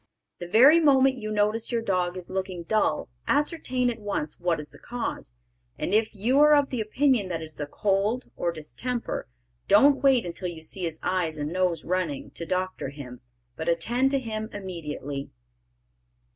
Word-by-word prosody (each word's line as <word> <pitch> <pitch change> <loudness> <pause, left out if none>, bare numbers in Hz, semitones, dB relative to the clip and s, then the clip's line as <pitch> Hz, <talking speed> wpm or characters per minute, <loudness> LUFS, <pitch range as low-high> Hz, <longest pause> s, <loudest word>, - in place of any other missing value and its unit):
The 175 - -6
very 260 - +7
moment 270 -4 +4
you 215 -1 -5
notice 215 +2 +1
your 230 -1 0
dog 180 -3 0
is 180 - -8
looking 185 -2 -4
dull 190 -5 +1 0.2
ascertain 285 -4 +1
at 230 - -8
once 200 -7 -3
what 175 -2 0
is 150 - -8
the - - -16
cause, 240 - -5 0.5
and - - -2
if 220 +1 +2
you 240 +8 +2
are 300 0 +7
of 285 -2 +2
the 250 -4 -1
opinion 230 -2 +1
that 165 -2 -3
it 160 - -9
is - - -9
a 145 - -3
cold 205 - 0
or 170 - -1
distemper, 170 - -4 0.4
don't 270 +7 +6
wait 265 -5 +4
until 175 +1 -5
you 165 -2 -7
see 180 +3 -4
his 160 -2 -4
eyes 170 -4 0
and 150 +2 -3
nose 180 -2 0
running, 180 -6 -2
to 170 - -7
doctor 185 -5 -2
him, 130 -3 -10 0.3
but 160 +1 -3
attend 235 +11 +2
to 275 0 +1
him 220 -3 -4
immediately. 150 -7 -6
195 Hz, 180 wpm, -26 LUFS, 170-245 Hz, 0.5 s, very